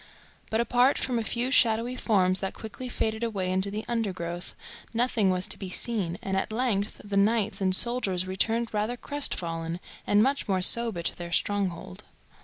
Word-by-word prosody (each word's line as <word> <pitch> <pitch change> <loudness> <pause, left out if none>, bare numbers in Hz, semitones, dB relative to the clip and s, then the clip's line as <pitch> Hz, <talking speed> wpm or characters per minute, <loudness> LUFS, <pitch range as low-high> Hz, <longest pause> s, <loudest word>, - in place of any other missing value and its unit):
But, 220 - 0
apart 245 +3 +3
from 245 -3 -1
a - - -2
few 240 +3 -1
shadowy 235 -1 +3
forms 190 -6 +2
that 195 - -4
quickly 240 +3 -7
faded 220 -1 -2
away 195 -5 -1
into 190 +2 0
the 210 +2 -5
undergrowth, 180 -7 -3 0.4
nothing 230 -4 +2
was 185 0 0
to - - -2
be 190 - -5
seen, 185 -4 -1
and 190 0 -2
at 190 - -1
length 215 -3 -1
the 200 -1 -2
knights 215 0 +2
and 185 -1 +3
soldiers 200 -6 +2
returned 225 +5 -1
rather 215 +4 -1
crestfallen, 170 - -2 0.3
and 205 +1 +5
much 275 0 0
more 190 -2 +1
sober, 225 -5 +5
to - - -2
their 170 -1 -7
stronghold. 185 - -2
210 Hz, 175 wpm, -27 LUFS, 185-235 Hz, 0.4 s, and